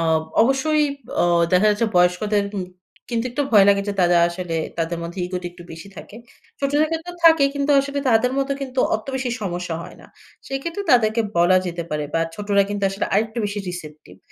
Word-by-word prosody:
অ - - 0 0.4
অবশ্যই 270 +5 +2 0.4
অ - - +3 0.3
দেখা 185 +3 +4
যাচ্ছে 210 +2 +1
বয়স্কদের 190 +4 +2
উম 190 - -2 0.5
কিন্তু 235 0 -1
একটু 250 +4 -1
ভয় 205 -3 +7
লাগে। 200 0 +4
যে - - 0
তারা 175 -1 +4
আসলে 175 -1 -4 0.2
তাদের 165 +1 -2
মধ্যে 170 +3 -7
ইগোটা 180 0 -5
একটু 175 - -13
বেশি 165 +4 -10
থাকে। 210 - -11 0.4
ছোটদের 290 +2 +1
ক্ষেত্রেও 330 +2 -5
থাকে, 320 -3 +7
কিন্তু 285 0 -1
আসলে 280 +1 -4
তাদের 240 +2 +3
মতো 275 0 0
কিন্তু 260 -1 -6 0.2
অত 215 - -4
বেশি 260 -1 -2
সমস্যা 175 -3 -3
হয় - - -12
না। - - -15 0.4
সেক্ষেত্রে 330 +8 -4
তাদেরকে 225 -2 +3 0.2
বলা 175 +2 +5
যেতে 170 -1 -4
পারে 150 -1 -2
বা 165 - +2
ছোটরা 205 0 +1
কিন্তু 205 0 -4
আসলে 195 +2 -3
আরেকটু 220 +3 0
বেশি 205 0 -4
receptive 155 - -9
205 Hz, 190 wpm, -21 LUFS, 180-265 Hz, 0.5 s, ভয়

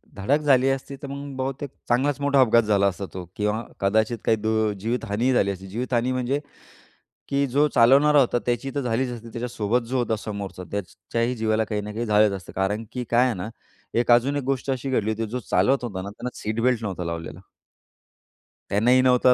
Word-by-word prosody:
धडक 130 +9 +1
झाली 135 -3 +4
असती, 135 +1 -3
तर 140 - -6
मग 140 0 -7
बहुतेक 135 +2 -3 0.2
चांगलाच 135 +4 +2
मोठा 140 -1 +3
अपघात 115 -1 +5
झाला 100 -2 +3
असता 100 0 -3
तो 90 -1 -6
किंवा 105 +2 -1 0.2
कदाचित 110 +4 +1
काही 110 - +3
दु 110 0 +1
जीवितहानीही 115 +2 0
झाली 100 -5 +2
असती. 95 0 -8
जीवितहानी 120 +4 -1
म्हणजे, 130 +2 0 0.9
की 140 0 +2
जो 145 +4 +3
चालवणारा 140 +5 +6
होता 125 -2 +2
त्याची 120 +3 -1
तर 140 - 0
झालीच 125 +1 0
असती. 115 -1 -8
त्याच्यासोबत 120 -1 -1
जो 130 - 0
होता 120 -2 0
समोरचा 100 -4 -6
त्याच्याही 100 +5 -3
जीवाला 110 -1 +1
काही 105 0 -2
ना 105 +1 -6
काही 115 +2 -2
झालंच 105 -1 +4
असतं. 95 -3 -7
कारण 105 +4 -1
की 125 - -3
काय 120 +2 +5
आहे 125 - +1
ना, 110 - -4 0.4
एक 120 +1 +2
अजून 120 +4 +4
एक 145 - -2
गोष्ट 135 +1 -1
अशी 130 +1 -3
घडली 110 -4 +1
होती. 110 +1 -2
जो 125 - -2
चालवत 135 0 +3
होता 100 -6 -4
ना, 100 - -6
त्यांना 125 +4 -7
सीट 110 +2 -2
बेल्ट 120 -2 +2
नव्हता 95 -4 -3
लावलेला. 85 -1 -5 1.3
त्यांनीही 120 +6 +4
नव्हता 125 0 +5
115 Hz, 195 wpm, -24 LUFS, 105-130 Hz, 1.3 s, चालवणारा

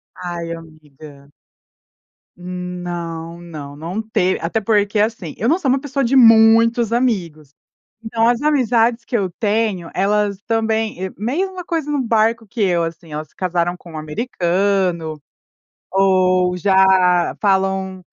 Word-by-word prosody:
Ai, 170 -1 -5
amiga. 150 -3 -14 1.1
Hum, 180 0 -6
não 170 -1 -6
não 150 -4 -9
não 170 +8 -4
te 200 -4 0
até 195 +7 -1
porque, 205 0 +1
assim, 210 -7 -1
eu 230 +5 0
não 340 +4 +2
sou 290 - -3
uma 265 +1 +2
pessoa 275 -1 -2
de 250 +2 +1
muitos 230 -1 +5
amigos, 175 - -1 0.5
então 225 0 0
as 240 +1 +1
amizades 240 -5 +2
que 235 - -2
eu 195 -3 -1
tenho, 210 -5 -1
elas 200 0 0
também, 220 -3 -1
eh, 190 - -2
mesma 360 - -3
coisa 325 -4 -2
no 290 -2 0
barco 225 -1 +1
que 225 +2 -5
eu 175 -3 +2
assim, 165 -1 -9
elas 155 +1 -5
se - - -34
casaram 175 -1 -1
com 175 -1 -14
um 155 - -6
americano 175 - -1 0.7
ou 185 -1 +2
já 190 -2 +3
falam 190 -1 0
190 Hz, 140 wpm, -19 LUFS, 175-225 Hz, 1.1 s, muitos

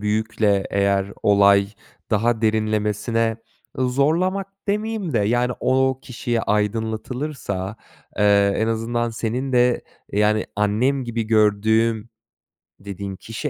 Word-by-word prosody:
büyükle 105 -1 0
eğer 100 0 +1
olay 100 -1 +5 0.4
daha 115 +1 +1
derinlemesine 110 +1 0 0.4
Iıı, 130 -1 +1
zorlamak 170 +9 +1 0.2
demeyeyim 210 -4 -2
de 115 - +2
yani 120 +4 +1
o 130 0 +2
kişiye 120 -2 -2
aydınlatılırsa, 110 0 -2 0.4
eee, 100 -1 +4
en 110 - 0
azından 115 +1 -1
senin 120 +4 -3
de 125 -1 +3 0.3
yani, 105 +1 +2
"Annem 115 +7 +1
gibi 115 -1 -2
gördüğüm." 110 +1 +2 0.7
dediğin 100 0 -6
kişi 115 +9 -5
110 Hz, 105 wpm, -22 LUFS, 105-125 Hz, 0.7 s, olay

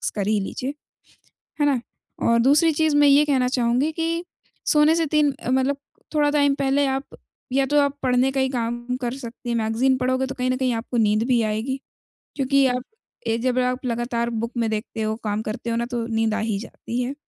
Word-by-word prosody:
कर 200 -2 -1
ही 215 0 +2
लीजिए, 255 +7 -4 0.9
है - - +4
ना? 270 -5 +2 0.4
और 235 0 +4
दूसरी 295 +6 +5
चीज़ 310 -1 +2
मैं 290 0 +6
ये 285 +2 +6
कहना 265 -4 +2
चाहूँगी 250 +3 +1
कि 330 +1 -2 0.4
सोने 305 +1 +4
से 330 - +1
3 300 -1 +2
अ, - - -5
मतलब 265 +2 +1 0.4
थोड़ा 295 -1 +3
टाइम 285 -2 +3
पहले, 275 +1 +1
आप 270 +1 -1 0.5
या 270 0 +3
तो 295 +2 +3
आप 280 0 0
पढ़ने 255 +1 +3
का 270 - -1
ही 265 - +1
काम 240 -1 -3 0.2
कर 240 -1 -2
सकती 245 -2 -8
हैं, 235 - 0
मैगज़ीन 230 +4 +1
पढ़ोगे 260 +1 0
तो 270 - -6
कहीं 255 0 -1
न 255 - 0
कहीं 255 -2 +1
आपको 235 +2 -3
नींद 215 0 +3
भी 245 -3 +3
आएगी, 220 +5 -2 0.6
क्योंकि 275 0 +3
आप 250 0 -1 0.4
ए 225 0 +1
जब 255 0 +1
आप 250 +1 -1
लगातार 235 0 -1
बुक 230 0 -3
में 230 -2 +1
देखते 220 +1 -4
हो, 215 0 -1
काम 210 0 -1
करते 215 +2 -4
हो 230 - 0
ना, 235 - 0
तो 240 -2 -3
नींद 225 -1 0
आ 220 - -1
ही 220 -2 -1
जाती 235 +1 -5
है। 250 +2 -2
255 Hz, 215 wpm, -23 LUFS, 230-275 Hz, 0.9 s, मैं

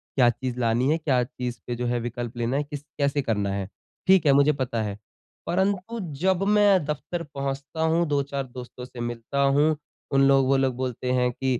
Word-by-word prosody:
क्या 125 -3 +5
चीज़ 125 +1 -3
लानी 120 +3 +2
है, 160 - +3
क्या 135 -6 +1
चीज़ 125 -2 -5
पे 120 - -2
जो 125 +1 -3
है 120 0 0
विकल्प 120 0 -5
लेना 120 +3 0
है, 150 - +1
किस 145 -1 -7 0.2
कैसे 140 0 +1
करना 105 -5 -1
है? 100 -1 -3 0.4
ठीक 190 -4 +6
है, 140 - +6
मुझे 140 +2 +5
पता 120 -3 -1
है। 105 -1 -4 0.5
परंतु 195 +4 0 0.2
जब 190 0 +2
मैं 200 -5 +5
दफ्तर 170 +3 -3
पहुँचता 140 +3 -4
हूँ, 165 +1 +2
2-4 140 -1 -1
दोस्तों 125 0 -9
से 125 -1 -12
मिलता 120 +3 -3
हूँ, 145 +3 +3 0.4
उन 135 0 +5
लोग 135 -1 +5
वो 135 0 +4
लोग 130 -2 +1
बोलते 125 0 -3
हैं 125 -1 +2
कि 130 -1 -1
135 Hz, 200 wpm, -25 LUFS, 120-150 Hz, 0.5 s, ठीक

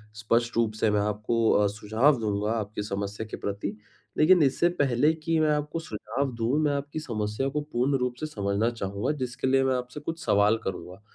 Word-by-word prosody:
स्पष्ट 115 +2 0
रूप 110 -2 +2
से 110 - +4
मैं 105 - +2
आपको 105 +2 +1
अ, 105 -1 +4
सुझाव 110 +7 +2
दूँगा, 105 0 -1
आपकी 105 -2 -3
समस्या 100 +1 -4
के - - -4
प्रति। 100 0 -4 0.4
लेकिन 170 +3 +6
इससे 140 +5 +3
पहले 140 +3 +3
की 160 0 -1
मैं 155 -1 +3
आपको 150 +2 -3
सुझाव 130 0 -3
दूँ, 120 +5 0
मैं 145 -1 +2
आपकी 145 +2 -4
समस्या 110 -1 -2
को 150 +2 -2
पूर्ण 130 +3 +1
रूप 125 -1 -2
से - - -3
समझना 105 -5 0
चाहूँगा। 100 +2 -2
जिसके 125 +1 -3
लिए 135 0 +3
मैं 130 -1 +2
आपसे 125 +3 -5
कुछ 165 +2 -5
सवाल 105 +2 +4
करूँगा। 95 +1 -6
115 Hz, 195 wpm, -27 LUFS, 105-140 Hz, 0.4 s, लेकिन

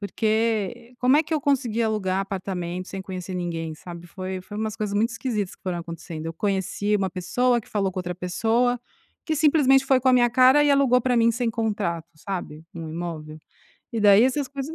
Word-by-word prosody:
porque 220 +2 -1
como 255 +3 +4
é - - +4
que 320 +1 -3
eu 300 - 0
consegui 245 -5 +1
alugar 195 -4 0
apartamento 185 -2 -4
sem 195 -1 -6
conhecer 185 -1 -6
ninguém, 165 -3 -3
sabe, 175 +1 -10
foi 185 +1 -5
foi 205 +3 -10
umas 220 -1 -2
coisas 210 -2 -3
muito 225 +4 +2
esquisitas 225 -5 -3
que - - -46
foram 180 -2 -2
acontecendo. 165 -1 -7
Eu 165 - -3
conheci 205 +2 0
uma 190 -2 -1
pessoa, 240 +7 +1
que - - -20
falou 195 -3 -1
com 185 - -5
outra 180 0 -4
pessoa, 225 +7 0 0.4
que 315 -2 -1
simplesmente 280 -3 +4
foi 265 -1 +4
com 260 - +2
a - - +5
minha 240 -1 +4
cara 260 +3 +6
e 290 - +3
alugou 270 -3 +4
pra 250 0 +1
mim 230 0 +4
sem 235 0 -1
contrato, 205 -8 -2
sabe, 165 -3 -6
um 165 -1 -6
imóvel? 160 -2 -6 0.5
E 230 - -2
daí 205 +2 +7
essas 265 +1 0
coisas 280 +3 -6
210 Hz, 205 wpm, -24 LUFS, 180-245 Hz, 0.5 s, daí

